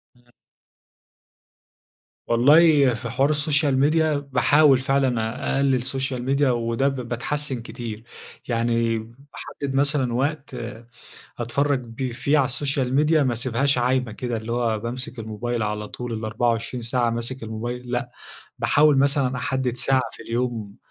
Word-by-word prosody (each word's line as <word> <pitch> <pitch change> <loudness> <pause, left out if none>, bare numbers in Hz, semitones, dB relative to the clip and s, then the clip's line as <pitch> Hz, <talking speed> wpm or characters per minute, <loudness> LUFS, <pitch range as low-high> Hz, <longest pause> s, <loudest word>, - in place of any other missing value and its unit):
امم. 120 0 -28 2.0
والله 140 +2 +5
في 115 0 -5
حوار 140 +6 +2
الsocial 145 -1 +1
media 160 +2 +3 0.3
باحاول 145 +2 +5
فعلًا 130 -3 +1
أ - - -2
أقلل 135 -3 +2
social 130 -1 -2 0.2
media - - +3
وده 120 +2 +1
ب 135 - -1
باتحسن 130 +1 0
كتير. 115 -2 -7 0.4
يعني 115 -1 +1
باحدد 135 +3 -8
مثلًا 140 -3 +1
وقت 140 +3 -2 0.8
أتفرج 140 +4 0
ب 120 +1 -5
فيه 140 +5 +1
على 135 0 +2
الsocial 135 -1 -1
media 160 0 +3
ما 135 -5 +2
أسيبهاش 130 +3 0
عايمة 125 -2 +1
كده، 120 0 -3
اللي 110 +1 -5
هو 115 -3 0
بامسك 120 +2 -6
الموبايل 115 +2 -3
على 105 0 -3
طول 125 -1 -6
ال24 115 +2 -2
ساعة 120 0 +1
ماسك 120 +2 -4
الموبايل، 120 +3 -5
لأ، 120 0 -2 0.5
باحاول 150 -2 +4
مثلًا 135 -2 +2
أحدد 125 -1 -2
ساعة 130 +1 +2
في - - -11
اليوم 115 -4 -3
125 Hz, 135 wpm, -23 LUFS, 115-140 Hz, 2.0 s, والله